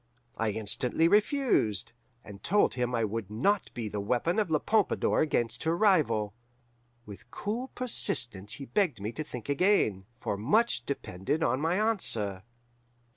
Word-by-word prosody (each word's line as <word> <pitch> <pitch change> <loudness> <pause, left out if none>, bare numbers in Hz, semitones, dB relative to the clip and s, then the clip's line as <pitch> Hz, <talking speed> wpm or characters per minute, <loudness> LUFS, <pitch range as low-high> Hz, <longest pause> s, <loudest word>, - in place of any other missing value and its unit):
I 110 -1 0
instantly 110 +9 0
refused, 210 - +2 0.3
and 100 -2 -11
told 205 +3 +2
him 125 -1 -1
I 115 - +1
would 105 -1 -4
not 175 - 0
be 115 -3 -3
the 105 0 -4
weapon 125 - 0
of 210 -5 0
La 155 - +3
Pompadour 215 +5 +1
against 120 -6 0
her 165 +1 +1
rival. 135 - +2 0.7
With 100 +3 -12
cool 225 - -4
persistence 120 - +1
he 140 - -6
begged 150 - 0
me 105 +3 -4
to 155 - -4
think 125 -7 -8
again, 140 - +2
for 100 - -2
much 140 - +1
depended 140 - -2
on 130 +4 +1
my 165 +3 +1
answer. 115 - 0
125 Hz, 150 wpm, -29 LUFS, -, 0.7 s, La